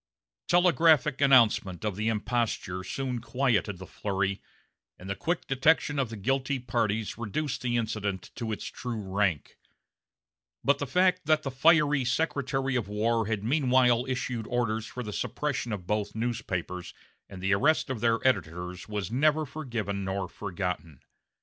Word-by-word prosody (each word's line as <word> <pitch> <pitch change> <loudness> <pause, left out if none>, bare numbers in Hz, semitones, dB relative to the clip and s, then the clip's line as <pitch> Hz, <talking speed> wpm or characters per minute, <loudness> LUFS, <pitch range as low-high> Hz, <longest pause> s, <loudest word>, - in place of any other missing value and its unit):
Telegraphic 160 -5 +4
announcement 115 -9 +4
of 105 -3 -1
the 105 +2 -2
imposture 110 -4 -1
soon 125 +2 -3
quieted 115 -6 0
the 95 - -9
flurry, 100 0 -2 0.6
and 90 - -11
the 100 - -2
quick 165 - -2
detection 145 +1 +2
of 130 -4 0
the 115 - -6
guilty 135 +5 0
parties 110 -3 -1
reduced 125 +6 -2
the 120 -1 0
incident 105 -4 -3
to 115 -2 -4
its 105 - -4
true 120 -3 -5
rank; 95 -5 -1 1.0
but 140 0 +3
the 145 - -2
fact 180 +2 +2
that 155 -1 +3
the 135 - -3
fiery 150 0 +4
Secretary 135 0 0
of 120 -6 -1
War 110 +2 0
had 105 -2 -2
meanwhile 125 -1 +3
issued 125 -3 -3
orders 115 -2 -1
for 125 - -6
the 105 -2 -6
suppression 125 +1 -2
of 100 -4 -4
both 105 +1 -2
newspapers 110 -6 -3 0.3
and 95 - -9
the 95 +2 +1
arrest 145 +6 +2
of 120 -5 -4
their 115 -1 +3
editors 90 -4 -2
was 105 -1 -3
neither 155 +5 +2
forgiven 115 -9 -4
nor 95 0 -2
forgotten. 90 -7 -5
115 Hz, 150 wpm, -28 LUFS, 100-135 Hz, 1.0 s, Telegraphic